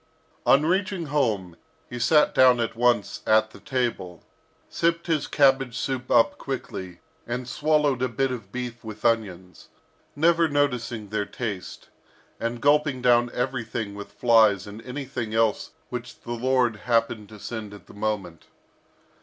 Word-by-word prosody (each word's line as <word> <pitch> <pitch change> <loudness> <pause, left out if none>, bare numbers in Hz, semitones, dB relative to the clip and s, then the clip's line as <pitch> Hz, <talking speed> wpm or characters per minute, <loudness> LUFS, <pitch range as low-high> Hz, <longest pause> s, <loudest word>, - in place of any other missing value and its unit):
On 140 +3 +5
reaching 185 0 0
home, 105 - 0 0.3
he 120 - -7
sat 150 +5 +4
down 125 -2 +6
at 115 -1 -2
once 120 -3 +1
at 110 0 +4
the - - -14
table, 120 - -3 0.4
sipped 170 0 0
his 160 -4 0
cabbage 135 -4 +3
soup 130 -1 -3
up 120 +4 +3
quickly, 95 -9 -6 0.3
and 120 +1 -4
swallowed 145 -1 +1
a 130 - +2
bit 135 +3 0
of 110 -6 -7
beef 125 -1 -6
with 110 0 -9
onions, 95 -6 -1 0.5
never 165 +2 +3
noticing 125 -7 -1
their 105 -1 -2
taste, 105 -7 -6 0.5
and 115 +1 -3
gulping 145 -3 +2
down 120 -1 +4
everything 115 -5 -3
with 100 0 -9
flies 110 -5 +4
and 105 +2 -9
anything 125 -4 -4
else 115 -2 +1 0.2
which 125 -1 -7
the 120 - -8
Lord 125 -2 +1
happened 115 -2 0
to 110 - -11
send 110 -1 -6
at 105 - -13
the - - -15
moment. 100 -6 -4
120 Hz, 145 wpm, -25 LUFS, 110-135 Hz, 0.5 s, down